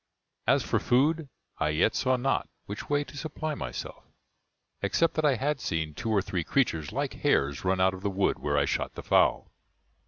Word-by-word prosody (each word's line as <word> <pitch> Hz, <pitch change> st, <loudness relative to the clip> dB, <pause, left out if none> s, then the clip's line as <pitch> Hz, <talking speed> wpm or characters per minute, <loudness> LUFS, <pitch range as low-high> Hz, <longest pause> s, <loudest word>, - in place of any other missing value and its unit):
As -, -, +4 dB
for -, -, +1 dB
food, 145 Hz, +4 st, +2 dB, 0.3 s
I 75 Hz, -, +1 dB
yet 75 Hz, +3 st, +2 dB
saw 130 Hz, 0 st, +2 dB
not 135 Hz, +2 st, 0 dB, 0.2 s
which 100 Hz, +1 st, -7 dB
way 145 Hz, 0 st, +2 dB
to 145 Hz, -, -13 dB
supply 155 Hz, +1 st, -4 dB
myself, 65 Hz, -, -6 dB, 0.8 s
except 165 Hz, -1 st, +2 dB
that 155 Hz, -, 0 dB
I 140 Hz, -3 st, +4 dB
had 140 Hz, +4 st, -1 dB
seen 80 Hz, -6 st, -2 dB
two 110 Hz, -, -4 dB
or 105 Hz, -4 st, +2 dB
three 90 Hz, -3 st, -2 dB
creatures 80 Hz, -, 0 dB
like -, -, -2 dB
hares 70 Hz, +1 st, +1 dB
run 95 Hz, 0 st, +1 dB
out 95 Hz, 0 st, +4 dB
of 95 Hz, -, -8 dB
the 100 Hz, -, 0 dB
wood 95 Hz, 0 st, 0 dB
where 70 Hz, 0 st, 0 dB
I 70 Hz, -, +3 dB
shot -, -, -2 dB
the -, -, -7 dB
fowl. -, -, +3 dB
105 Hz, 195 wpm, -28 LUFS, -, 0.8 s, As